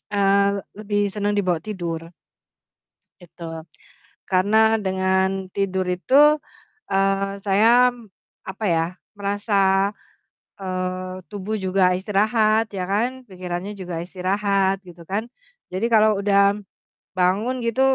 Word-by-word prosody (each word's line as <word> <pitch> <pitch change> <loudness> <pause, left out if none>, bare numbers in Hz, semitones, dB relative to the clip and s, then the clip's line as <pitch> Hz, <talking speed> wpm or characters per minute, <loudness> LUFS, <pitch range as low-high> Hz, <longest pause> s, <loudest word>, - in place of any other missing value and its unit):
eee, 200 0 +4 0.3
lebih 205 -1 -1
seneng 205 0 -1
dibawa 180 -4 +1
tidur. 170 -5 -5 1.1
Itu. 165 -2 -9 0.6
Karena 220 +4 +3
dengan 190 0 0
tidur 190 -2 -1
itu, 285 +12 +4 0.5
eee, 195 0 +1
saya 225 +6 +5
m 235 -3 -15 0.4
apa 190 +3 -5
ya, 165 -1 +2 0.3
merasa, 200 -1 +1 0.7
eee, 185 0 -3 0.2
tubuh 205 +1 -4
juga 185 -1 +2
istirahat 215 +3 +2
ya 180 - -2
kan, 250 +5 -1
pikirannya 185 +1 -5
juga 180 -3 -5
istirahat, 195 +1 0
gitu 175 -1 -13
kan. 210 +5 -2 0.4
Jadi 190 +5 0
kalau 215 -2 +5
udah 200 0 +3 0.6
bangun 195 +8 +1
gitu 230 +3 0
195 Hz, 105 wpm, -22 LUFS, 185-210 Hz, 1.1 s, saya